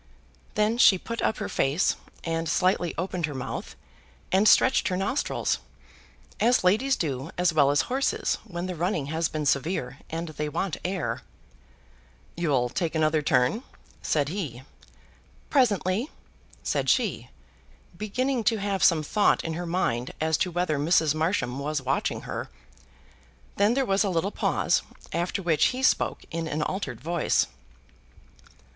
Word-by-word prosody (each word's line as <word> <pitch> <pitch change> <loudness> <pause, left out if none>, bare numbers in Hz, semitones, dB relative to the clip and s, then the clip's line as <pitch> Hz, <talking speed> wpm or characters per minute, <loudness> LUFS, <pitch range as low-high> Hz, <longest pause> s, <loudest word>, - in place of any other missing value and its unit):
Then 215 +3 +1
she 195 - +7
put 230 +5 -5
up 220 - +1
her - - -3
face, 140 +7 +1 0.3
and 165 -1 -2
slightly 180 +1 +1
opened 175 -2 -2
her 145 - -6
mouth, 130 - -5 0.6
and 195 +4 +4
stretched 260 - +5
her 180 - 0
nostrils, 255 +9 0 0.8
as 240 0 +3
ladies 225 +9 +3
do 140 -2 -3
as 180 -1 +2
well 145 -3 +4
as 145 0 +3
horses 270 +2 0
when 175 -5 -5
the 185 - -3
running 165 -4 -2
has 160 0 0
been 155 -1 -3
severe 140 -2 0
and 165 +1 -4
they 150 -1 -3
want 165 +3 -2
air. 160 -10 -2 1.1
"You'll 140 -8 +1
take 165 +4 -2
another 155 0 +2
turn," 145 - +2 0.4
said 145 -2 0
he. 150 - -5 0.9
"Presently," 220 - +2 0.5
said - - 0
she, - - +1 0.7
beginning 245 +6 -1
to 225 - +3
have 195 -2 -1
some 160 -3 +5
thought 205 +7 +2
in 165 - -3
her 175 +2 -4
mind 130 -9 -1
as 160 0 +2
to 185 - 0
whether 175 -4 0
Mrs. 160 0 +3
Marsham 155 -6 -1
was 150 +1 -1
watching 135 0 -1
her. - - -5 1.1
Then 205 +4 +3
there 270 -1 +2
was 195 -2 +2
a 200 - 0
little 185 +3 0
pause, - - +1 0.3
after 175 +3 -1
which 165 -3 +3
he 255 +1 0
spoke - - +2
in 165 0 -3
an 150 0 -1
altered 190 +5 -3
voice. 170 0 +1
170 Hz, 150 wpm, -26 LUFS, 150-195 Hz, 1.1 s, she